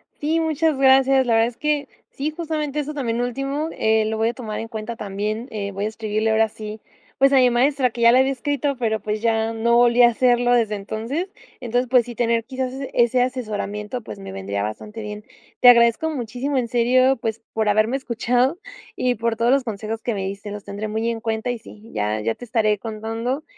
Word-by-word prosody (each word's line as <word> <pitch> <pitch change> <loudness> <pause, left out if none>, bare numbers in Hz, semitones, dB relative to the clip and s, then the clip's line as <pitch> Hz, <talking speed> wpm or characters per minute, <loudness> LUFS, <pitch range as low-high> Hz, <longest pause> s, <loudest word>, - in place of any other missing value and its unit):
Sí, 315 +3 0
muchas 320 -2 +1
gracias. 265 0 +5
La 235 - +3
verdad 225 0 +4
es 240 - -8
que 295 -2 0 0.2
sí, 290 +3 -3
justamente 305 -3 -3
eso 300 +1 -3
también 240 -4 -1
último, 275 +5 -2
eh, 220 0 +2
lo 220 0 -2
voy 225 +1 +2
a - - -3
tomar 225 -4 -5
en 225 - -5
cuenta 225 0 -6
también, 210 +3 -4
eh, 200 -2 -4
voy 200 +2 -3
a - - +1
escribirle 220 0 -1
ahora 220 0 +3
sí, 215 0 -8 0.4
pues, 275 +1 +5
a 270 - +6
mi 250 -1 +6
maestra 260 +2 +2
que 235 - -6
ya 235 0 +7
le 255 - +5
había 265 +1 +3
escrito, 280 +1 -1
pero, 220 -3 0
pues, 210 0 -3
ya 225 -1 +1
no 235 +1 +2
volví 240 0 +5
a - - +9
hacerlo 245 0 +2
desde 225 -3 +2
entonces. 225 - -4 0.3
Entonces, 245 +1 0
pues, 250 -2 +4
sí 240 - -7
tener 230 0 +1
quizás 260 0 -4 0.2
ese 240 +1 +3
asesoramiento, 215 -2 -4
pues, 105 - -9
me 95 0 -8
vendría 100 +1 -4
bastante 210 - -6
bien. 210 0 -7 0.4
Te 250 - +5
agradezco 235 +5 +5
muchísimo, 255 +1 -3
en 245 -2 0
serio, 255 +2 +3
pues, 225 0 -4
por 220 -1 +1
haberme 215 +5 +2
escuchado 250 +4 0 0.4
y 250 -1 0
por 230 0 -1
todos 235 +2 +2
los 275 0 +3
consejos 220 -1 -5
que 240 - -1
me 195 -2 -3
diste, 200 +1 -6
los 205 -1 -7
tendré 205 +2 -5
muy 220 +2 -1
en 230 -1 -3
cuenta 225 +1 -2
y 245 - -3
sí, 220 0 -14
ya 105 +1 -1
ya 115 +1 0
te - - -10
estaré 220 -3 +1
contando, 225 +6 -4
235 Hz, 215 wpm, -22 LUFS, 215-255 Hz, 0.4 s, a